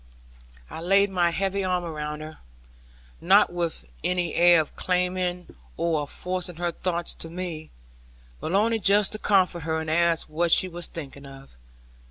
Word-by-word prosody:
I - - -8
laid 195 +3 +3
my 175 -2 +2
heavy 195 +3 -1
arm 180 -1 0
around 150 -2 -5
her, 155 0 -10 0.8
not 190 +1 +4
with 170 - -3 0.2
any 180 -2 -1
air 175 0 +6
of 155 - -3
claiming 180 - -2 0.2
or 165 -3 0
of 145 - -6
forcing 180 -1 -3
her 175 +1 -2
thoughts 175 0 -3
to 165 - -8
me, 165 -3 -6 0.7
but - - -4
only 225 +3 +2
just 200 +1 +4
to 215 - -4
comfort 185 -5 +2
her, 160 +1 -2
and 160 0 -4
ask 170 0 +1
what 165 +2 0
she 185 - +6
was 175 -1 -5
thinking 140 -3 -9
of. 135 - -13
175 Hz, 165 wpm, -25 LUFS, 160-185 Hz, 0.8 s, air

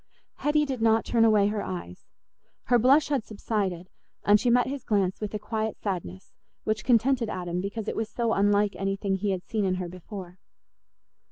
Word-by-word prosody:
Hetty 300 +1 +2
did 265 -4 -4
not 225 0 +3
turn 230 -1 +2
away 210 -2 +4
her 210 -1 -2
eyes; 90 -1 -7 0.6
her 245 0 +3
blush 275 +7 +4
had 275 -6 0
subsided, 200 -5 -3 0.4
and 205 +1 +6
she 245 - +1
met 245 +1 +4
his 275 +1 -5
glance 195 -3 0
with 210 - -3
a - - +1
quiet 220 0 -3
sadness, 170 - -5 0.3
which 215 0 -1
contented 240 -1 +2
Adam 180 -1 -3
because 205 +3 -5
it - - -2
was 220 -1 -2
so 230 -1 0
unlike 205 0 +2
anything 195 0 -1
he 205 +2 -2
had 185 -2 -2
seen 215 -2 -1
in 185 -1 +1
her 180 -1 -4
before. 185 0 -9
210 Hz, 185 wpm, -27 LUFS, 190-230 Hz, 0.6 s, and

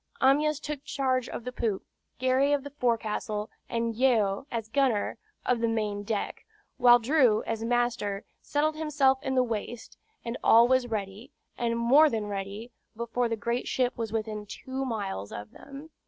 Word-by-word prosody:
Amyas 295 +3 +3
took 295 -2 -5
charge 260 -3 -1
of - - -6
the 250 - -4
poop, 225 -5 -2 0.3
Gary 260 +3 +2
of 285 -2 +1
the 285 - -8
forecastle, 220 -4 -1 0.2
and 230 0 -1
Yeo, 230 -2 +2
as 225 -2 -3
gunner, 240 -4 +1 0.3
of 250 -2 +2
the 230 - +1
main 210 -2 -1
deck, 205 0 -3 0.3
while 240 -1 +7
Drew, 245 -3 +3
as 225 0 -3
master, 235 -4 0 0.2
settled 305 +1 0
himself 285 -4 +2
in 265 - -2
the 255 - +4
waist; 230 0 -5 0.3
and 235 +1 -4
all 230 +1 +7
was 255 -1 +2
ready, 210 +2 -5 0.3
and 230 -1 -1
more 275 +7 +6
than 220 -5 -2
ready, 200 +3 -5 0.2
before 235 +1 -1
the 225 - -1
great 235 +2 -2
ship 250 -1 0
was 225 -3 -4
within 215 -1 -3
two 260 +5 -5
miles 200 - -4
of 105 +1 -7
them. 280 +3 -11
235 Hz, 170 wpm, -28 LUFS, 220-265 Hz, 0.3 s, while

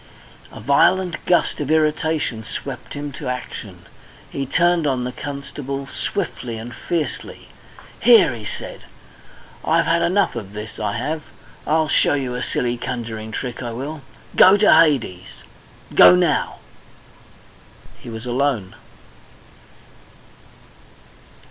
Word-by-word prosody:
A - - -10
violent 170 - +2
gust 175 - +2
of 145 -2 -3
irritation 155 -6 +1
swept 130 +3 -7
him 145 0 -5
to 140 0 -7
action. 125 0 -6 0.5
He 135 -1 -3
turned 175 +1 +2
on 130 -3 0
the 125 - -3
constable 140 0 -6
swiftly 135 - -4
and 115 +2 -8
fiercely. 160 +4 -4 0.5
"Here," 225 - +6
he 115 -2 -8
said, 105 - -7 0.8
"I've - - +2
had 170 +1 +2
enough 190 -2 +2
of 105 -4 -6
this, 105 +1 -8
I 105 - -1
have! 150 +7 -2 0.5
I'll 155 +1 +2
show 145 - +3
you 130 -3 -2
a 125 - -3
silly 120 -1 -1
conjuring 115 -3 -5
trick, 125 +2 -5
I 120 -2 -4
will! 145 +6 -5 0.3
Go 190 +2 +8
to 210 +1 +6
Hades! 140 - +2 0.5
Go, 90 0 +9
now!" 90 - +1 1.4
He - - -10
was 110 +1 -7
alone! 125 -6 -1
135 Hz, 125 wpm, -21 LUFS, 120-155 Hz, 1.4 s, Go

